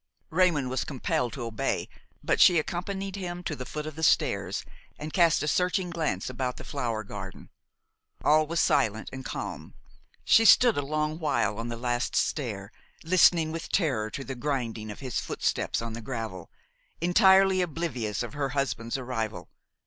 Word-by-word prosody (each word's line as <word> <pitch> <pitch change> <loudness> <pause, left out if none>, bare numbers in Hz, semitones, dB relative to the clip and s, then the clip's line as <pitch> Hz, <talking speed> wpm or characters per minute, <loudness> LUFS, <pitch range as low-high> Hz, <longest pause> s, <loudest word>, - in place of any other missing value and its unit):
Raymon 165 -6 +3
was 130 0 -1
compelled 125 -3 -2
to 130 - -5
obey; 115 -2 -2 0.4
but - - +1
she 175 - +7
accompanied 190 +4 -3
him 175 -2 -5
to 155 - -3
the 130 -2 -7
foot 150 0 -5
of 155 - -6
the 160 - -7
stairs 160 - +1 0.3
and 150 +1 -7
cast 170 -4 +4
a - - -2
searching 180 +2 +1
glance 155 - -2
about 130 0 -3
the - - -8
flower 120 -6 -3
garden. 100 -2 -9 0.7
All 155 +1 +4
was 170 +1 -1
silent 110 -8 +1
and 130 0 -6
calm. - - -6 0.5
She 225 - +6
stood 235 +1 +7
a - - 0
long 155 +2 -2
while 115 - 0
on 115 - -3
the 120 0 -4
last 120 0 -1
stair, 105 -9 -1 0.3
listening 165 -2 +4
with 165 0 -5
terror 130 - 0
to 135 - -6
the 135 - -5
grinding 120 -5 -3
of 105 - -8
his 130 -4 -2
footsteps - - -1
on 115 -1 -5
the 115 - -6
gravel, 110 -7 -5 0.5
entirely 190 +1 +5
oblivious 145 - -2
of 120 - -7
her 145 -2 -2
husband's 120 -3 -2
arrival. 115 -5 -4
140 Hz, 170 wpm, -27 LUFS, 115-165 Hz, 0.7 s, she